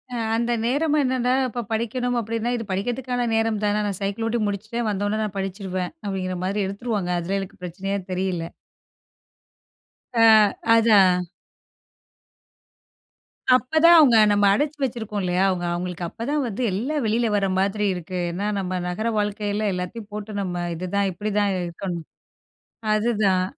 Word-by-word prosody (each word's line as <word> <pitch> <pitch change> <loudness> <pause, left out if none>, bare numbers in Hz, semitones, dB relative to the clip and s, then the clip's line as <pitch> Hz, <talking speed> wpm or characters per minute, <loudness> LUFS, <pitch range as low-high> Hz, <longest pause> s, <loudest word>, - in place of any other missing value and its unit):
அ - - -2 0.2
அந்த 235 +1 0
நேரம் 290 +5 +1
என்னன்னா, 255 -2 +1 0.2
இப்ப 240 0 -4
படிக்கணும் 245 +2 -1
அப்டின்னா, 230 +1 -2
இது 230 - -5
படிக்கிறதுக்கான 245 +5 -2
நேரம் 225 -1 +1
தானே 210 0 +1
நான் 195 - -3
சைக்கிள் 200 +3 -2
ஓட்டி 235 +1 0
முடிச்சுட்டேன் 220 +3 -3
வந்தவுடனே 205 +2 -1
நான் 205 -2 -4
படிச்சிருவேன் 190 -1 -3
அப்டிங்கிற 185 -2 -3
மாரி 200 +2 0
எடுத்துருவாங்க. 200 -2 -3
அதில 190 +4 -2
எனக்கு 195 -2 -8
பிரச்சனையே 195 +3 -3
தெரியல. 180 -2 -2 1.7
ஆ 230 - +6 0.5
அதான். 205 -5 +5 2.4
அப்ப 255 +5 +1
தான் 340 0 +9
அவங்க 260 -8 +7
நம்ம 205 0 +3
அடைச்சி 295 +7 0
வச்சிருக்கோம் 220 -5 -3
இல்லையா? 180 +1 +1
அவங்க 180 -2 -1
அவங்களுக்கு 180 0 -4
அப்பதான் 280 - -2
வந்து 225 +1 -4
எல்லாம் 265 +9 -1
வெளில 230 +2 +1
வர்ற 200 -1 +2
மாதிரி 200 +2 0
இருக்கு. 180 +1 -6
ஏன்னா, 195 +4 -3
நம்ம 185 -1 -2
நகர 215 +6 -2
வாழ்க்கையில 210 0 -1
எல்லாத்தையும் 190 +4 -5
போட்டு 210 0 -6
நம்ம, 175 -2 -3
இதுதான் 190 +4 -1
இப்டிதான் 205 +1 0
இருக்கணும் 175 0 -5 0.9
அதுதான். 210 -4 +2
205 Hz, 135 wpm, -23 LUFS, 190-230 Hz, 2.4 s, தான்